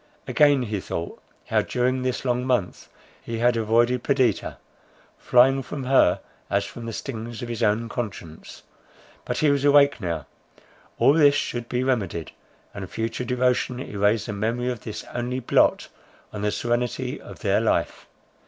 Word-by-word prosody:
Again 145 -3 +4
he 105 -3 -3
thought, 85 -2 -5 0.3
how - - +3
during 125 +1 0
this 130 +1 -2
long 125 0 0
month, 125 -8 -1 0.3
he 115 - -5
had 120 +1 +3
avoided 120 +2 +2
Perdita, 135 -2 0 0.6
flying 135 +2 +4
from 135 +1 -6
her 130 -8 +3 0.3
as 100 0 +1
from 115 +3 -8
the - - -3
stings 115 0 -6
of 120 - -6
his 115 -1 -4
own 110 +1 +1
conscience. 100 -9 -7 0.6
But - - -3
he 150 -2 +3
was 140 -1 0
awake 140 -3 +5
now; 85 -6 -3 0.7
all 130 +4 +5
this 145 -2 +5
should 120 -4 -3
be 125 0 0
remedied; 100 -11 -1 0.4
and 95 -2 -7
future 115 +3 -3
devotion 125 0 0
erase 105 -3 0
the 105 - -4
memory 115 +5 -1
of 120 - -5
this 105 0 -7
only 125 +1 -2
blot 120 - +2 0.5
on 105 - -5
the 105 - +1
serenity 120 +1 -2
of - - -12
their - - +2
life. - - -1
120 Hz, 160 wpm, -24 LUFS, 110-130 Hz, 0.7 s, awake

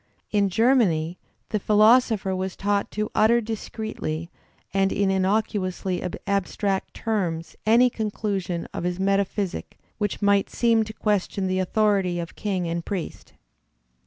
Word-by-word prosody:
In 205 -2 +2
Germany 185 -7 +2 0.3
the 215 - 0
philosopher 215 -1 +4
was 185 0 -3
taught 200 0 0
to 215 0 -3
utter 225 +2 +4
discreetly 215 -7 -5 0.4
and 195 0 +2
in 200 -1 +1
innocuously 190 -2 0 0.2
abstract 200 0 -1
terms 175 -8 -2
any 235 +3 +6
conclusion 205 -6 -3
of - - -4
his 180 +1 -2
meta 195 +1 +2
physic 190 -1 -4 0.2
which 205 -2 -1
might 200 -1 +3
seem 230 -2 +2
to 220 - -8
question 205 -2 -1
the 185 0 0
authority 195 -2 +1
of 170 -1 -5
king 190 -4 -2
and 170 0 -2
priest. 190 -4 -5
200 Hz, 130 wpm, -24 LUFS, 185-215 Hz, 0.4 s, any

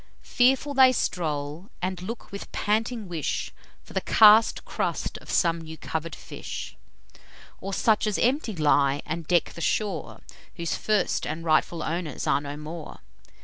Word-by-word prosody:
Fearful 265 +3 +2
they 260 -1 +7
stroll, 155 - -2
and 185 0 -3
look 220 +5 -7
with 200 - -8
panting 220 +1 -1
wish 165 -4 -3 0.3
For - - -14
the - - 0
cast 220 +1 +6
crust - - -3
of - - -16
some 170 -2 +2
new 160 0 -9
cover'd 160 +1 -4
fish; - - -7 0.8
Or 195 - -5
such 215 +3 +2
as 210 - 0
empty 250 -3 +1
lie, 145 -3 +2
and 160 -1 -4
deck 175 -2 +2
the 170 - -8
shore, 195 -3 -2 0.3
Whose 170 -2 -2
first 210 -3 0
and 160 +2 -4
rightful 165 +1 +2
owners 160 -3 -3
are - - +2
no 145 0 -6
more. 155 +1 -8
175 Hz, 150 wpm, -26 LUFS, 160-215 Hz, 0.8 s, they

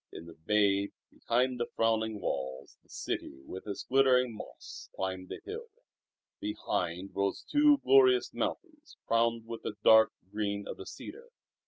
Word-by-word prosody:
In 80 - -9
the 85 - -11
bay 100 +3 +2 0.2
behind 125 +1 0
the 120 - -1
frowning 110 -1 +1
walls 65 -7 -4
the - - -33
city 65 - -5
with 95 +7 -8
its 100 - -4
glittering 125 -2 +3
mosques 105 - -10
climbed 95 -1 -4
the - - -7
hill. 450 +3 -6 0.7
Behind 95 - -3
rose 100 0 -1
two 295 0 +6
glorious 385 -2 +5
mountains 310 -4 -5
crowned 115 0 +1
with 115 0 -7
the 105 - -5
dark 110 0 +7 0.2
green 100 -1 -2
of - - -6
the - - -9
cedar. 475 +1 -10
110 Hz, 150 wpm, -31 LUFS, 100-135 Hz, 0.7 s, dark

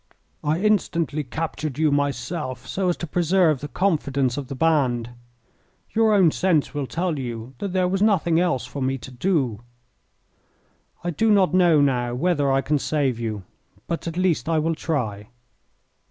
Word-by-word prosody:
I 150 +3 +1
instantly 170 -7 +1
captured 155 0 -4
you 155 -1 +2
myself, 140 -1 -2
so 190 -1 -1
as 175 - 0
to - - -4
preserve 170 -3 +2
the 145 - -4
confidence 140 -6 0
of 140 -2 -5
the 135 - -6
band. 130 -6 +1 0.8
Your 225 -1 +3
own 180 -5 +5
sense 170 -4 +1
will 145 -2 -3
tell 170 -1 -2
you 120 -1 -6
that 200 - -3
there 185 -1 +2
was 190 +1 -1
nothing 175 -6 +3
else 170 -8 0
for 130 +3 -7
me 135 +1 0
to 130 - -11
do. 130 - 0 1.4
I 175 - -1
do 220 +8 +1
not 195 -4 +4
know 175 -5 +5
now 120 -3 +1
whether 145 -1 +1
I 135 0 +3
can 145 +2 0
save 135 -5 0
you, 110 -4 -4 0.4
but 170 0 -4
at 165 +1 -4
least 180 -3 +1
I 165 - +2
will 160 +2 +1
try." 110 -11 -3
150 Hz, 170 wpm, -23 LUFS, 130-175 Hz, 1.4 s, own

